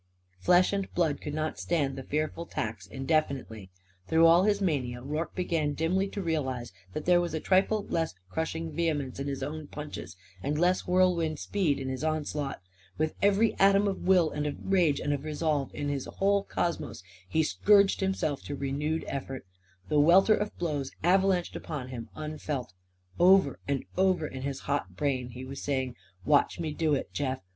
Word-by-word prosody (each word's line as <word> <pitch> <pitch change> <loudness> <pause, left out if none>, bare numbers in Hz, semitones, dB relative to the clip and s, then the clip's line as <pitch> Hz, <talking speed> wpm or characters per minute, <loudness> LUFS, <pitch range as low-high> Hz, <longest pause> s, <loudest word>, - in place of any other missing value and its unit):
Flesh 180 - +4
and 195 -1 -2
blood 160 -5 +1
could 150 0 -4
not 155 0 -2
stand 145 -6 0
the 135 - -5
fearful 155 +4 -2
tax 105 -3 -4
indefinitely. 135 - -1 0.4
Through 165 +1 +5
all 170 +3 +6
his 205 -1 +2
mania 135 -10 -1
Rorke 150 +4 -3
began 165 -5 0
dimly 185 +5 +1
to 200 0 -5
realise 130 -8 -2 0.2
that 155 - -4
there 175 -1 +5
was 170 -2 -2
a - - -1
trifle 195 +4 +2
less 165 - -1
crushing 160 +6 -3
vehemence 150 -6 -1
in 140 - -3
his 135 -1 -3
own 150 +1 -5
punches 150 -11 -7 0.2
and 145 +2 -1
less 180 +2 +2
whirlwind 180 -4 +2
speed 165 -5 0
in 135 - -4
his 130 +2 -3
onslaught. 150 -5 -2 0.4
With 155 0 0
every 205 +2 +4
atom 200 +1 +5
of 195 -2 -3
will 180 -4 +5
and 150 0 -2
of 145 - -3
rage 175 -7 +2
and 145 - 0
of 140 -1 -3
resolve 150 -2 -1
in 145 0 -3
his 140 -2 -2
whole 200 0 +2
cosmos, 170 - -3 0.3
he 160 - +2
scourged 200 +4 +4
himself 190 -7 -1
to 145 - -4
renewed 145 +4 -2
effort. 135 -3 -5 0.4
The 150 - +3
welter 180 +8 +6
of 210 0 -2
blows 145 -6 -2
avalanched 185 0 +2
upon 140 -6 -5
him, 120 -3 -7
unfelt. 150 -7 -4 0.5
Over 180 -5 +5
and 140 -2 -1
over 185 -3 +2
in 130 -3 -6
his 135 0 -4
hot 140 -11 -2
brain 130 0 -1
he 125 +2 -8
was 135 +1 -7
saying: 130 -3 -1 0.3
"Watch 145 -1 +3
me 160 -2 -2
do 155 -2 +1
it, - - -4
Jeff! 135 -2 -2
155 Hz, 180 wpm, -29 LUFS, 140-175 Hz, 0.5 s, all